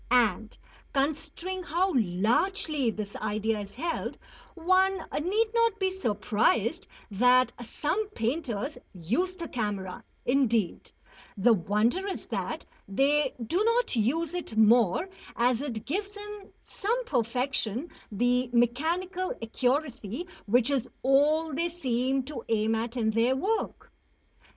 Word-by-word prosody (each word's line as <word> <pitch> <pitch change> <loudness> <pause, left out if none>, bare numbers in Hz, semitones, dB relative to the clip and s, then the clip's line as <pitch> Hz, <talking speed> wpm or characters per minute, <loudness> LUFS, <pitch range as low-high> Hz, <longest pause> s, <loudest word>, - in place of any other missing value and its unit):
And, 230 -2 +2 0.4
considering 315 +6 -2
how 360 +3 0
largely 250 - +1
this 210 -2 -5
idea 215 +1 -1
is 200 -1 -8
held, 330 +6 -3 0.4
one 375 +3 +3 0.2
need 415 +8 +2
not 460 -2 +3
be 380 -2 +1
surprised 225 - +1 0.2
that 250 +5 +4
some 355 - -2
painters 255 - -2 0.2
use 245 - -1
the 340 -3 -6
camera; 205 -7 -3 0.2
indeed, 235 -7 +1 0.5
the 230 +4 +5
wonder 215 - +1
is 390 - -4
that - - -4 0.2
they 275 +7 +2
do 355 - +1
not 465 - +2
use 295 +9 +1
it 345 -11 -5
more, 220 - +5 0.3
as 240 +1 +2
it 240 -7 -4
gives 400 +6 -3
in 415 -1 -9 0.2
some 470 +5 -1
perfection 250 - -1 0.2
the 245 +4 +1
mechanical 330 +10 +1
accuracy 250 - -1 0.2
which 245 +5 +3
is 260 -3 0
all 300 +4 +3
they 335 +5 0
seem 265 -5 0
to 290 +2 -7
aim 220 0 +2
at 230 +2 -2
in 220 -2 +2
their 230 +4 +2
work. 420 +10 -2
260 Hz, 120 wpm, -28 LUFS, 225-345 Hz, 0.5 s, the